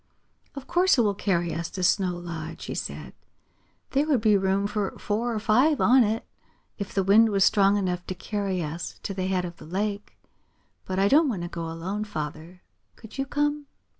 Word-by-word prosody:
"Of 275 -1 -7
course 360 -2 +3
it - - +5
will 210 -3 +2
carry 175 -4 0
us 165 +1 -3
to 185 - -5
Snow 180 -1 +2
Lodge," 165 -2 -7
he - - -4
said. - - -6 0.8
"There 280 +3 +1
would 275 -7 +2
be 215 -2 +4
room 195 0 +1
for 205 -1 -2
four 225 +4 -1
or 225 - -2
five 250 +8 +3
on 255 +2 +6
it, 220 +1 -1 0.5
if 200 - -4
the 195 - 0
wind 215 +4 +6
was 195 -2 +3
strong 200 0 +4
enough 180 -3 -2
to 185 - -4
carry 195 -1 -2
us 160 +3 -6
to 195 - -3
the 185 -1 -2
head 185 -1 0
of 170 -1 -8
the - - -12
lake. 200 +3 -3 0.7
But 185 - -3
I 195 +1 +4
don't 295 +6 +5
want 190 -8 -3
to - - -3
go 170 -2 -5
alone, 185 +6 -4
Father. 165 -2 -7 0.3
Could 225 +3 -12
you 270 - -1
come?" 295 +1 -1
200 Hz, 200 wpm, -26 LUFS, 180-220 Hz, 0.8 s, on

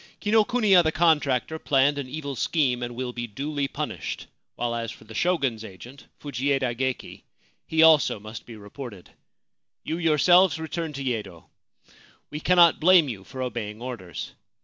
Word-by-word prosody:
Kinokuniya 215 -2 +4
the 160 - +1
contractor 160 -3 +1
planned 145 0 +2
an 130 -2 -6
evil 140 -1 -5
scheme, 130 -3 0
and 120 0 -5
will 125 0 -4
be 120 -1 -4
duly 140 +6 -3
punished; - - -5 0.3
while 120 -1 -2
as 115 -1 -3
for - - -14
the 110 - -13
Shogun's 135 -6 0
agent, 120 +7 -12
Fujieda 135 -3 -1
Geki, 130 +1 -4 0.5
he 160 0 +3
also 155 -8 +5
must 110 +1 -10
be 115 - -9
reported. 105 -1 -10 0.7
You 165 - -3
yourselves 175 +2 +4
return 160 0 -4
to 140 0 -5
Yedo. 105 -9 -4 0.9
We 150 - -5
cannot 175 0 +5
blame 170 -3 +5
you 100 -6 -6
for 130 +5 -6
obeying 110 -3 -5
orders. 110 - -7
135 Hz, 150 wpm, -25 LUFS, 120-160 Hz, 0.9 s, also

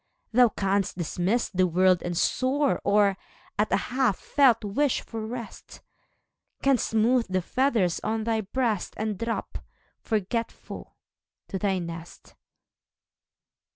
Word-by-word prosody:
Thou 245 0 +6
canst 195 -2 -1
dismiss 185 +7 0
the 185 -1 +2
world 185 +1 +3
and 175 -1 -3
soar, 270 - +1
Or, 200 -1 +3 0.4
at 210 - +1
a 195 - +4 0.2
half 255 -7 +2
felt 255 -6 +3
wish 265 +7 +1
for 225 -1 -6
rest. 230 0 -8 0.8
Canst 275 -4 +3
smooth 230 +2 +2
the 185 0 +1
feathers 230 -8 +1
on 220 +1 -2
thy 225 -1 0
breast, 220 -1 -1
And 215 0 -2
drop, 230 0 -3 0.4
forgetful, 225 +1 -4 0.5
to 190 - -3
thy 195 -2 +1
nest. 170 -1 -8
215 Hz, 120 wpm, -26 LUFS, 190-240 Hz, 0.8 s, Thou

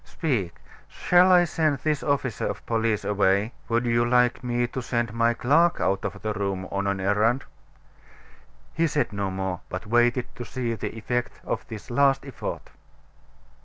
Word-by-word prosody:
Speak, 120 - -2 0.3
shall 180 +1 +4
I 180 -1 +7
send 155 -3 0
this 150 +2 -1
officer 140 -4 -1
of - - -5
police 115 -2 0
away? 100 +2 +2 0.2
Would 120 +1 +1
you 120 0 +2
like 125 +1 +2
me 120 0 0
to 130 +1 -5
send 120 -2 -2
my 115 0 +2
clerk 165 +9 +3
out 95 +1 0
of 100 - -5
the 110 -1 -1
room, 100 -3 -3
on 100 0 -1
an 100 -1 -1
errand?" 105 +7 +2 1.3
He 165 +1 +2
said 145 -8 -1
no 100 -1 -2
more, 95 -2 -3
but 90 0 -5
waited 120 +2 +2
to 120 - -5
see 120 +1 -3
the 115 +1 -5
effect 120 +3 -3
of - - -3
this 110 +2 -9
last 135 +1 +3
effort. 135 -4 -6
120 Hz, 165 wpm, -25 LUFS, 105-130 Hz, 1.3 s, I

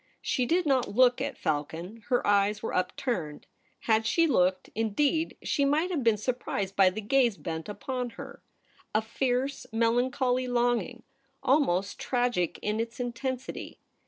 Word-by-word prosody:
She 250 -3 0
did 350 +4 +2
not 260 -7 +1
look 250 0 +5
at - - -3
Falcon 160 +6 -3
— - - -24
her 245 -2 +2
eyes 205 +1 +2
were - - -3
upturned. 180 - -2 0.4
Had 220 -1 +2
she 335 - +3
looked, 185 - +1
indeed, 280 +9 0
she 280 - +1
might 305 +6 +2
have 305 -7 -1
been 225 -2 +4
surprised 205 -4 -3
by 190 -1 +6
the 205 +4 -5
gaze 235 -1 +2
bent 160 +2 -5
upon 250 +4 -4
her: - - -9 0.5
a 215 - +3
fierce, 250 +3 -1
melancholy 245 +3 +1
longing, 240 -1 0 0.4
almost 200 - +2
tragic 245 -9 0
in 210 +1 -1
its 230 +2 -4
intensity. 250 +1 -4
240 Hz, 150 wpm, -28 LUFS, 205-260 Hz, 0.5 s, by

